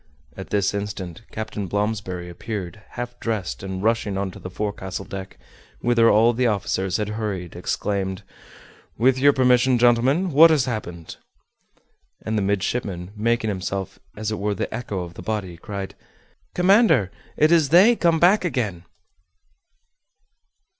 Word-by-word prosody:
At - - -8
this 100 -1 +1
instant 100 -4 -5
Captain 110 -2 -5
Blomsberry 100 -3 -2
appeared, 95 +1 -6
half 120 0 -6
dressed, 110 -6 -3
and 95 0 -5
rushing 110 -3 0
on 95 -1 -2
to - - -12
the 90 - -7
forecastle 95 -1 -4
deck, 95 -1 -8 0.4
whither 115 -1 +4
all 115 +3 +5
the 125 +1 +1
officers 95 -3 -1
had 105 -1 -2
hurried, 105 -5 -4
exclaimed, 95 -2 -2 0.7
"With 130 +3 +3
your 145 +2 +6
permission, 125 -1 +3
gentlemen, 125 +9 +3
what 160 +4 +8
has 150 -5 +3
happened?" 85 -9 -6 1.1
And 110 - -1
the 105 - +1
midshipman, 95 -2 -2
making 115 +1 0
himself 95 0 -4 0.2
as 110 0 -3
it 110 - -3
were 105 0 -1
the - - -4
echo 105 -7 -4
of 85 -1 -9
the - - -10
body, 95 -3 -3
cried, 100 +1 -6 0.6
"Commander, 180 - +4 0.3
it 155 +2 +4
is 160 -5 +4
'they' 195 +9 +6
come 170 -5 +2
back 185 +5 +5
again!" 110 - -2
105 Hz, 145 wpm, -23 LUFS, 95-125 Hz, 1.1 s, what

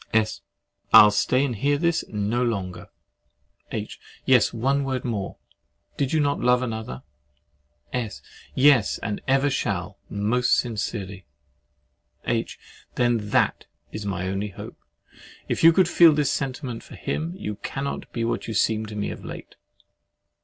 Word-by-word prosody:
S. 110 -1 +1 0.5
I'll 105 - +9
stay 130 +6 +2
and 125 -4 -2
hear 145 +7 +1
this 170 +1 +1
no 105 +3 -1
longer. 95 -7 -3 0.8
H. - - -5 0.3
Yes, - - +4
one 135 +5 0
word 130 -2 -3
more. 105 -5 -3 0.6
Did 135 -2 -1
you 160 - +2
not 145 -1 +1
love 125 +1 +3
another? 110 - -5 0.9
S. 120 -4 -3 0.4
Yes, 130 -5 +4
and 105 -2 -3
ever 135 +1 +3
shall - - -2
most 110 +5 +2
sincerely. 100 -4 -3 1.0
H. - - -1 0.4
Then, 120 -4 +1
THAT - - +1 0.2
is 110 - -5
my 95 -2 -3
only 100 +2 -2
hope. 95 - -10 0.7
If - - -2
you 165 - +9
could 180 +1 +4
feel 170 -2 +7
this 145 -2 +1
sentiment 130 -3 -3
for - - -13
him, 165 +3 -3
you 105 - -5
cannot 140 +1 -5
be 115 - -2
what 115 - -2
you 110 - -4
seem 110 +1 +1
to 105 - -8
me 105 -1 -2
of - - -9
late. - - -9
120 Hz, 145 wpm, -24 LUFS, 105-135 Hz, 1.0 s, I'll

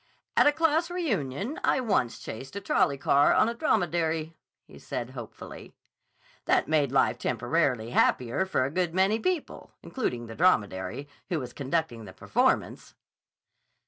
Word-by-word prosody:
"At - - +5
a - - +6
class 325 +2 +1
reunion 225 - -2
I - - +2
once 195 - 0
chased 130 - -8
a - - -2
trolley 165 -7 +1
car 140 +1 +4
on - - +4
a 235 - -1
dromedary," 165 - 0 0.3
he - - -15
said 120 +1 -5
hopefully. 120 -4 -10 0.7
"That - - +2
made 150 -4 +2
life 130 -2 +2
temporarily 125 -1 0
happier 125 +10 +1
for 130 -8 +1
a 135 - -3
good 175 0 -1
many 195 +4 +3
people, 365 -1 -3
including 125 - -3
the 115 - -9
dromedary, 110 - +1 0.2
who 175 -4 0
was 125 -3 -7
conducting 140 -5 -2
the 95 - -11
performance." - - 0
155 Hz, 145 wpm, -27 LUFS, 125-200 Hz, 0.7 s, a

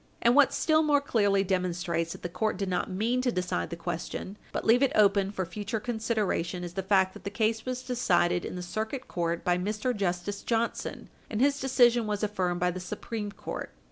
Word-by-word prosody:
And 235 - +5
what 290 -1 +6
still 315 -1 +3
more 295 -2 +4
clearly 205 -8 +2
demonstrates 175 -3 -1
that - - -12
the - - -1
court 215 +4 -1
did 195 -1 -2
not 180 - -1
mean 225 +7 0
to 250 -1 +1
decide 180 -4 -2
the 170 - -4
question, 175 +3 -5 0.2
but - - -3
leave 235 +3 +5
it 275 - +4
open 200 -2 +4
for 190 -2 -3
future 205 +5 -4
consideration, 215 -6 -1
is 175 -1 -6
the 190 - -2
fact 190 -1 +3
that - - -12
the - - -3
case 220 +3 0
was 255 0 -3
decided 185 -9 +2
in - - -5
the 180 - -5
Circuit 220 +8 -4
Court 170 -1 -2
by 180 0 +2
Mr. 215 +6 -1
Justice 195 +1 -2
Johnson, 230 0 -2 0.2
and 215 - -2
his 280 +2 +3
decision 240 -4 +4
was 210 0 -2
affirmed 185 -4 0
by 180 0 +2
the 185 - -5
Supreme 205 +3 -5
Court. - - -6
205 Hz, 205 wpm, -28 LUFS, 180-235 Hz, 0.2 s, what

